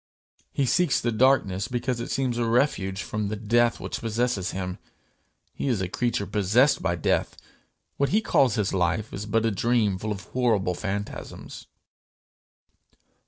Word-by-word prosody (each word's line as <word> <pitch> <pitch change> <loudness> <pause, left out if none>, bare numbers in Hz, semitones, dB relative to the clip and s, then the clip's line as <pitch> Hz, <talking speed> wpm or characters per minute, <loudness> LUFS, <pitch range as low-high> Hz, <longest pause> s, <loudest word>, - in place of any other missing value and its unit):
He 140 - 0
seeks 175 +8 +2
the 120 - -1
darkness 115 -5 +2
because 125 -1 -2
it 120 - -5
seems 125 -3 -1
a 120 - +1
refuge 105 -6 +1
from 105 -1 -3
the 105 - -3
death 115 +3 +2
which - - -5
possesses 115 -4 -1
him. 90 -1 -4 0.7
He - - -4
is 120 -6 +1
a 95 - -1
creature 115 +1 -1
possessed 105 +8 +3
by 90 -2 0
death; 85 - 0 0.6
what 140 - +1
he 210 - +3
calls 135 - +2
his 105 -3 0
life 95 +4 0
is 100 +2 -5
but 115 +2 +1
a 115 - +2
dream 105 -2 +1
full 110 +2 -3
of 100 -2 -5
horrible 110 -8 +1
phantasms. 100 +2 -6
110 Hz, 160 wpm, -26 LUFS, 100-125 Hz, 0.7 s, possessed